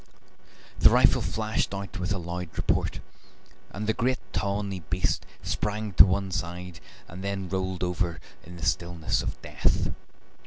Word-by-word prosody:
The -, -, +9 dB
rifle -, -, +5 dB
flashed 110 Hz, -2 st, -1 dB
out 100 Hz, +1 st, -5 dB
with 90 Hz, +1 st, -2 dB
a 100 Hz, -, +1 dB
loud 90 Hz, 0 st, -4 dB
report, -, -, +1 dB, 0.7 s
and 105 Hz, +1 st, -5 dB
the 110 Hz, -, +2 dB
great 125 Hz, +2 st, +1 dB, 0.2 s
tawny 100 Hz, 0 st, -1 dB
beast 90 Hz, +2 st, 0 dB, 0.2 s
sprang 105 Hz, 0 st, -1 dB
to -, -, +10 dB
one 95 Hz, +1 st, 0 dB
side 90 Hz, +1 st, -4 dB, 0.3 s
and 90 Hz, +3 st, -8 dB
then 100 Hz, -1 st, -2 dB
rolled 95 Hz, 0 st, -2 dB
over 90 Hz, -2 st, -1 dB, 0.2 s
in 90 Hz, +2 st, -10 dB
the 85 Hz, -, -4 dB
stillness 85 Hz, -2 st, 0 dB
of -, -, -4 dB
death. -, -, +1 dB
95 Hz, 150 wpm, -28 LUFS, 90-100 Hz, 0.7 s, to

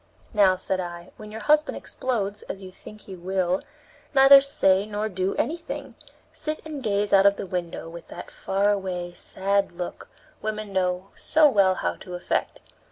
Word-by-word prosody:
"Now," 200 Hz, -3 st, +5 dB
said 185 Hz, 0 st, -2 dB
I, 175 Hz, -1 st, -6 dB
"when 215 Hz, -1 st, -10 dB
your 220 Hz, -, -7 dB
husband 300 Hz, 0 st, +3 dB
explodes, 210 Hz, -5 st, -3 dB
as 195 Hz, -, -6 dB
you 185 Hz, -, -9 dB
think 210 Hz, +3 st, -13 dB
he 190 Hz, -, -9 dB
will, 185 Hz, 0 st, -1 dB, 0.5 s
neither 275 Hz, +1 st, +9 dB
say 200 Hz, -8 st, +2 dB
nor 210 Hz, 0 st, -2 dB
do 185 Hz, 0 st, -1 dB
anything; 330 Hz, +2 st, -3 dB, 0.4 s
sit 310 Hz, 0 st, -3 dB
and 305 Hz, -3 st, -6 dB
gaze 205 Hz, -3 st, 0 dB
out 195 Hz, 0 st, +7 dB
of 200 Hz, -, +4 dB
the -, -, -5 dB
window 175 Hz, -3 st, -4 dB
with 170 Hz, 0 st, -10 dB
that -, -, -9 dB
far 200 Hz, +2 st, +1 dB
away, 180 Hz, -3 st, -3 dB
sad 195 Hz, +2 st, -1 dB
look 175 Hz, 0 st, -6 dB, 0.3 s
women 215 Hz, -1 st, -4 dB
know 185 Hz, 0 st, 0 dB
so 315 Hz, -1 st, +4 dB
well 195 Hz, -8 st, +4 dB
how -, -, -2 dB
to 180 Hz, -, -8 dB
affect. 340 Hz, -, -2 dB
195 Hz, 170 wpm, -25 LUFS, 185-215 Hz, 0.5 s, neither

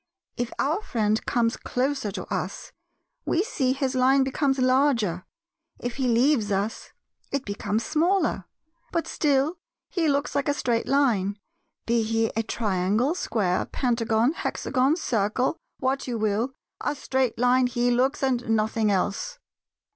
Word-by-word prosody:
If 245 Hz, -1 st, -3 dB
our 315 Hz, +9 st, 0 dB
friend 220 Hz, -, 0 dB
comes 235 Hz, -1 st, +1 dB
closer 265 Hz, -3 st, -1 dB
to -, -, -4 dB
us -, -, -4 dB, 0.5 s
we 355 Hz, -, +1 dB
see 265 Hz, -, 0 dB
his 270 Hz, 0 st, -1 dB
line 265 Hz, +1 st, +4 dB
becomes 270 Hz, +1 st, 0 dB
larger; 255 Hz, -, +2 dB, 0.5 s
if 245 Hz, +1 st, -5 dB
he 265 Hz, -2 st, 0 dB
leaves 235 Hz, -2 st, +3 dB
us 200 Hz, +3 st, -2 dB, 0.4 s
it 280 Hz, -1 st, -2 dB
becomes 205 Hz, +2 st, -2 dB
smaller; 345 Hz, +5 st, +1 dB, 0.5 s
but 335 Hz, -, 0 dB
still 290 Hz, +3 st, +1 dB, 0.3 s
he 335 Hz, -3 st, +1 dB
looks 285 Hz, 0 st, 0 dB
like 285 Hz, +1 st, 0 dB
a 285 Hz, -, +1 dB
straight 235 Hz, -4 st, 0 dB
line; 220 Hz, -8 st, +2 dB, 0.5 s
be 235 Hz, 0 st, +2 dB
he 225 Hz, 0 st, 0 dB
a 225 Hz, -, +2 dB
Triangle, 215 Hz, -, 0 dB
Square, 195 Hz, -, 0 dB
Pentagon, 235 Hz, -1 st, +1 dB
Hexagon, 270 Hz, -2 st, 0 dB
Circle, 245 Hz, -, 0 dB, 0.2 s
what 265 Hz, +1 st, -1 dB
you 240 Hz, -2 st, -2 dB
will—a 220 Hz, +7 st, -2 dB
straight 260 Hz, -3 st, -1 dB
Line 250 Hz, +1 st, +4 dB
he 245 Hz, 0 st, +1 dB
looks 260 Hz, +4 st, +1 dB
and 250 Hz, -3 st, 0 dB
nothing 220 Hz, 0 st, +1 dB
else. 200 Hz, -, -1 dB
250 Hz, 140 wpm, -25 LUFS, 220-275 Hz, 0.5 s, line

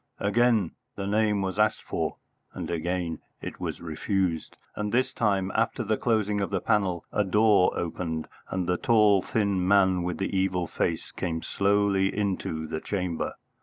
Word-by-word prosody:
Again 110 Hz, -2 st, +2 dB, 0.2 s
the 100 Hz, -, -4 dB
name 105 Hz, 0 st, +2 dB
was 95 Hz, +2 st, -3 dB
asked 105 Hz, 0 st, +2 dB
for, -, -, -2 dB, 0.4 s
and -, -, -4 dB
again 85 Hz, 0 st, -2 dB, 0.2 s
it -, -, -7 dB
was -, -, -4 dB
refused; 85 Hz, +1 st, -2 dB, 0.2 s
and 105 Hz, -1 st, -2 dB
this 130 Hz, +2 st, +1 dB
time, 100 Hz, -5 st, +1 dB
after 115 Hz, +2 st, 0 dB
the 110 Hz, 0 st, +1 dB
closing 105 Hz, -3 st, +1 dB
of 100 Hz, -, -1 dB
the 100 Hz, -, 0 dB
panel, 95 Hz, -5 st, 0 dB
a 105 Hz, -, +2 dB
door 105 Hz, -1 st, +4 dB
opened, 80 Hz, -2 st, -3 dB, 0.2 s
and 95 Hz, -1 st, -1 dB
the 90 Hz, +1 st, +1 dB
tall 105 Hz, -4 st, +4 dB
thin 100 Hz, -4 st, 0 dB
man 95 Hz, -2 st, +4 dB
with 90 Hz, 0 st, -2 dB
the 95 Hz, 0 st, -2 dB
evil 95 Hz, -2 st, +1 dB
face 80 Hz, 0 st, -2 dB
came 80 Hz, -2 st, -3 dB
slowly 100 Hz, -1 st, +2 dB
into 95 Hz, -6 st, -1 dB
the 80 Hz, 0 st, -4 dB
chamber. 90 Hz, -5 st, -2 dB
95 Hz, 165 wpm, -27 LUFS, 90-105 Hz, 0.4 s, door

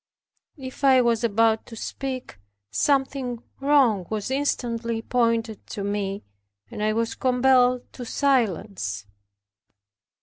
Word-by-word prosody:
If 260 Hz, 0 st, -9 dB
I 265 Hz, -2 st, +6 dB
was 235 Hz, -2 st, +2 dB
about 225 Hz, 0 st, +2 dB
to 230 Hz, -, -10 dB
speak, 255 Hz, -, -5 dB, 0.3 s
something 270 Hz, -, 0 dB, 0.2 s
wrong 265 Hz, -, +3 dB
was 215 Hz, +3 st, -3 dB
instantly 235 Hz, -5 st, -1 dB
pointed 230 Hz, -3 st, 0 dB
to 200 Hz, -, -5 dB
me, 200 Hz, 0 st, -2 dB, 0.5 s
and -, -, -6 dB
I 215 Hz, 0 st, +2 dB
was 225 Hz, +1 st, -1 dB
compelled 250 Hz, -1 st, +3 dB
to 250 Hz, -, -7 dB
silence. 200 Hz, -, 0 dB
235 Hz, 110 wpm, -24 LUFS, 215-260 Hz, 0.5 s, I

